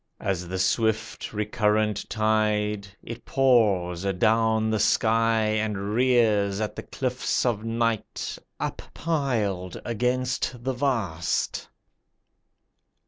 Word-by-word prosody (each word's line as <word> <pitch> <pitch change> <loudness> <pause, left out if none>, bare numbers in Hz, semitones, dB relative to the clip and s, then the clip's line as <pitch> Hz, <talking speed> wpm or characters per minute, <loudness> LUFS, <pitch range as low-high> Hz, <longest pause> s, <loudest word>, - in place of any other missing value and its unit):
As 90 -3 -2
the 95 +2 -3
swift 110 +3 0
recurrent 105 -1 0
tide, 105 -2 +1 0.2
It 115 0 -8
pours 105 -10 +2
adown 110 +3 +2
the 110 - +1
sky, 115 +1 +3
And 105 -2 -1
rears 110 -5 +3
at 110 -1 -3
the - - -5
cliffs 130 -1 -2
of 110 -4 0
night 115 -1 -2 0.2
Uppiled 115 - -2
against 125 +1 -1
the 130 +1 -1
vast. 115 - -1
110 Hz, 95 wpm, -26 LUFS, 105-120 Hz, 0.2 s, sky